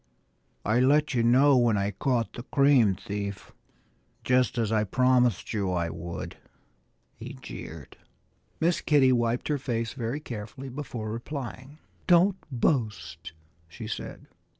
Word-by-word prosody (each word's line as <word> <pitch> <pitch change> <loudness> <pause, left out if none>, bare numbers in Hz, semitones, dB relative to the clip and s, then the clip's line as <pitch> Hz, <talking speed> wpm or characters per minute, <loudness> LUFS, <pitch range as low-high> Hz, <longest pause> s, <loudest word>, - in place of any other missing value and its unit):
"I 110 +4 +2
let 145 +3 +3
you 120 - +2
know 130 +5 +5
when 120 -4 +3
I 100 +1 0
caught 120 +2 -1
the 120 - -6
cream 135 -6 +4
thief, 100 +1 -6 0.7
just 125 0 +2
as 115 -2 0
I 110 -1 +2
promised 125 -2 +2
you 100 -3 -1
I 85 -2 -1
would," 85 +1 -6 0.8
he - - -9
jeered. 80 -4 -9 0.6
Miss 170 +1 +1
Kitty 140 -4 +4
wiped 120 -1 +1
her 150 -2 0
face 115 -3 -2
very 120 +2 -3
carefully 120 0 -7
before 120 -5 -5
replying. 130 +3 -6 0.3
"Don't 185 +2 +5
boast!" 110 - -1 0.3
she 80 - -9
said. - - -6
120 Hz, 130 wpm, -27 LUFS, 105-135 Hz, 0.8 s, know